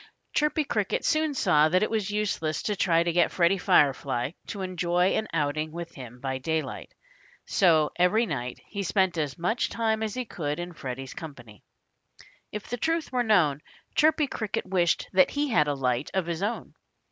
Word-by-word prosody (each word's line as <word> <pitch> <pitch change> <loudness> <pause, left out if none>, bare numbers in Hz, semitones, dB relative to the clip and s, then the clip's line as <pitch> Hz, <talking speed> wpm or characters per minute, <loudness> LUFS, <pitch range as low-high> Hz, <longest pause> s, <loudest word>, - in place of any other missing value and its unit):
Chirpy 300 +1 +2
Cricket 210 -8 -1
soon 310 -2 +1
saw 155 - +4
that 185 +4 +3
it 215 - -1
was 215 -3 -1
useless 205 -7 -1
to 210 - -1
try 170 -3 +3
to 170 - 0
get 175 -1 +4
Freddie 180 +2 +2
Firefly 135 -4 +2 0.2
to 200 -3 -5
enjoy 180 0 +1
an 220 - 0
outing 155 0 -1
with 170 +1 -7
him 125 -2 -10
by 130 0 -3
daylight. 160 +3 -3 0.5
So 160 -5 +3
every 180 +7 +3
night 125 - -4
he 200 - -5
spent 190 -1 +1
as 145 -4 -2
much 220 +8 0
time 220 -1 0
as 220 -2 -2
he 255 -1 -3
could 150 -7 -4
in 175 0 -5
Freddie's 130 -3 -6
company. 120 -10 -10 0.9
If 210 -1 -6
the 245 - -3
truth 325 +5 -1
were 250 -1 +1
known, 175 - +3 0.3
Chirpy 310 0 +3
Cricket 220 -6 -3
wished 180 -3 +1
that 185 0 +5
he 290 0 -1
had 155 -10 +3
a 145 - 0
light 125 0 -1
of 190 -3 +1
his 170 0 -3
own. 210 +4 -3
175 Hz, 180 wpm, -27 LUFS, 150-215 Hz, 0.9 s, that